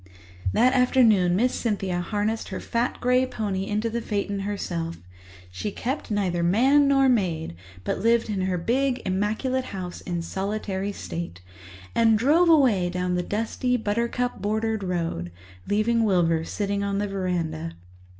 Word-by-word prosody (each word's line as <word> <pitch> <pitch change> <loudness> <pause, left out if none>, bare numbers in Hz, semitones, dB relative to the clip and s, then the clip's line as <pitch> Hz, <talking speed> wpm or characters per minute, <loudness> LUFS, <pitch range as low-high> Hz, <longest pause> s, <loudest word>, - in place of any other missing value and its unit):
That 250 - +4
afternoon 225 -8 +4
Miss 245 +6 +2
Cynthia 195 -6 -1
harnessed 210 +4 -2
her - - -4
fat 235 +1 -1
grey 250 +1 +3
pony 200 -5 -3
into 215 +2 -1
the 235 +1 -2
phaeton 200 -2 -2
herself—she 100 - -6
kept 265 +5 -3
neither 190 -5 0
man 260 +11 +4
nor 270 -1 +4
maid, 175 - 0 0.3
but - - -2
lived 230 +1 +3
in 205 -3 -2
her 185 -1 0
big, 250 +8 0
immaculate 215 +7 0
house 185 -5 -6
in 175 -2 -3
solitary 195 +1 -3
state—and 95 - -2
drove 310 +9 +4
away 245 - +4
down 180 0 -1
the 180 - +1
dusty, 230 +5 -1
buttercup 235 +3 -1
bordered 220 +1 -1
road, 170 - -2 0.4
leaving 225 +3 +2
Wilbur 170 -5 +2
sitting 200 +1 -2
on 200 0 -1
the 205 +1 0
verandah. 170 -4 -2
205 Hz, 140 wpm, -25 LUFS, 175-230 Hz, 0.4 s, That